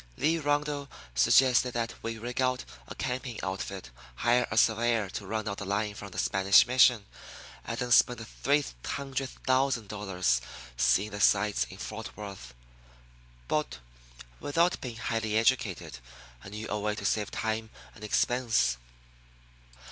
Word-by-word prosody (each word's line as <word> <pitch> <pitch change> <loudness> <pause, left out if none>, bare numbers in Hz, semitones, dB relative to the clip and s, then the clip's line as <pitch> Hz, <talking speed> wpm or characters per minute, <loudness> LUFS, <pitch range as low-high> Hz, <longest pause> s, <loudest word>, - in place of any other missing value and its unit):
Lee 160 +5 +2
Rundle 145 -1 -1 0.2
suggested 125 - +4
that 115 -1 -1
we 115 0 -4
rig 120 +3 -4
out 130 -1 0 0.2
a - - -8
camping 125 -3 -4
outfit, 95 -6 -5 0.2
hire 120 - +2
a 110 - -3
surveyor 115 -2 +2
to 100 - -6
run 110 +1 -3
out 100 -1 -3
the - - -4
line 105 +2 -1
from 100 0 -9
the - - -11
Spanish 95 +1 +5
mission, 125 -3 +4 0.6
and 115 - -4
then 125 0 -3
spend 120 +1 +5
the 115 - -8
three 145 +5 0 0.2
hundred 135 -1 -3 0.2
thousand 130 -5 +1
dollars 95 - 0 0.3
seeing 65 - +2
the 105 - -6
sights 105 +1 +3
in 95 - -11
Fort 110 +2 -7
Worth. 95 - -9 0.9
But, - - -1 0.6
without 170 +5 +1
being 120 -3 -5
highly 110 -2 -1
educated, 95 - 0 0.4
I - - -9
knew 105 +2 -6
a 105 - -2
way 105 0 -1
to - - -6
save 105 -2 0
time 110 0 -3 0.2
and 110 - -14
expense. 110 - +1
110 Hz, 150 wpm, -29 LUFS, 100-125 Hz, 0.9 s, Spanish